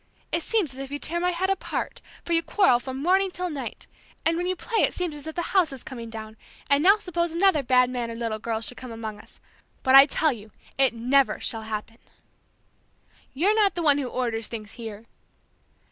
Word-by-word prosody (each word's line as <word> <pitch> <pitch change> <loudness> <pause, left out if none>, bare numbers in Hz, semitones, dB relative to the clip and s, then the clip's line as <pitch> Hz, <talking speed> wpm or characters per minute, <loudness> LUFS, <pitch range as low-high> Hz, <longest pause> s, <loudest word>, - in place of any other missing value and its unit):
It 335 - 0
seems 365 - 0
as 260 - -10
if 275 0 -6
you 285 - -3
tear 335 +4 -2
my 360 +1 +1
head 365 +2 0
apart, 390 - -3 0.2
for 340 - -1
you 330 - +4
quarrel 355 -8 +3
from 260 +2 -6
morning 380 +3 +3
till 360 -1 -4
night; 280 -3 -6 0.4
and 330 - +3
when 350 +1 -1
you 370 - 0
play 460 +4 -3
it - - +2
seems 355 -3 -2
as 295 +1 -9
if 315 - -6
the 345 - -1
house 365 -6 +4
is 270 -2 -8
coming 235 -3 -7
down; 220 -1 -8 0.3
and 280 +1 +5
now 395 +6 +6
suppose 345 -4 -2
another 340 -2 +3
bad 250 -1 +4
mannered 240 -2 -4
little 225 -2 -3
girl 225 0 -2
should 245 +2 -4
come 255 -2 -8
among 220 -2 -6
us! - - -18 0.4
But 260 - +3
I 275 +1 +10
tell 310 +1 +2
you 215 -4 -9 0.3
it 265 -3 +3
never 255 +4 +2
shall 225 - -2
happen!" 220 +1 -6 1.4
"You're 370 +10 +3
not 425 -2 +3
the 345 - -2
one 290 -2 +4
who 270 - -2
orders 235 -3 -2
things 215 -2 -7
here!" 225 -2 -8
275 Hz, 215 wpm, -25 LUFS, 230-345 Hz, 1.4 s, I